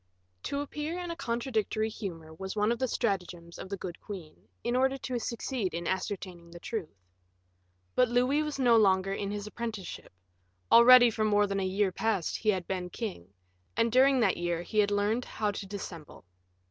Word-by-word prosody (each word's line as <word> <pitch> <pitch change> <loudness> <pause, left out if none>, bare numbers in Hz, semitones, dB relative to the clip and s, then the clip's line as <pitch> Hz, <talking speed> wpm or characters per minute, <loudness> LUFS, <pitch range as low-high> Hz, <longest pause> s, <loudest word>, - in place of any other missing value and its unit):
To 280 - -1
appear 300 +3 -4
in 355 -1 -4
a - - -4
contradictory 230 -5 -1
humor 165 -7 -7
was 190 +4 -6
one 210 +1 +2
of 235 - -1
the 260 - +1
stratagems 180 -7 -3
of - - -7
the 200 - -3
good 180 -2 -7
queen, 180 -7 -9 0.2
in 240 +1 0
order 265 +1 +2
to 255 -2 -3
succeed 235 -4 -3
in 170 0 -4
ascertaining 185 -2 -4
the 170 0 -11
truth. 165 - -6 0.9
But 250 -2 +3
Louis 250 +5 +2
was 300 -2 -3
no 245 -4 +5
longer 195 -2 +3
in 200 0 -3
his 205 0 -4
apprenticeship; 215 -3 -6 0.6
already 245 0 +9
for 220 0 -1
more 205 -1 +4
than 195 -1 -2
a - - -1
year 195 +1 +1
past 205 -3 -1
he 215 - 0
had 185 -4 +1
been 180 -1 -3
king, 180 - -6 0.5
and 230 0 +2
during 265 +2 +5
that 200 -4 +3
year 175 -1 -1
he 215 +4 -1
had 205 -1 +4
learned 205 +4 +1
how 210 -1 -1
to 200 -1 -6
dissemble. 180 - -8
210 Hz, 185 wpm, -30 LUFS, 185-240 Hz, 0.9 s, already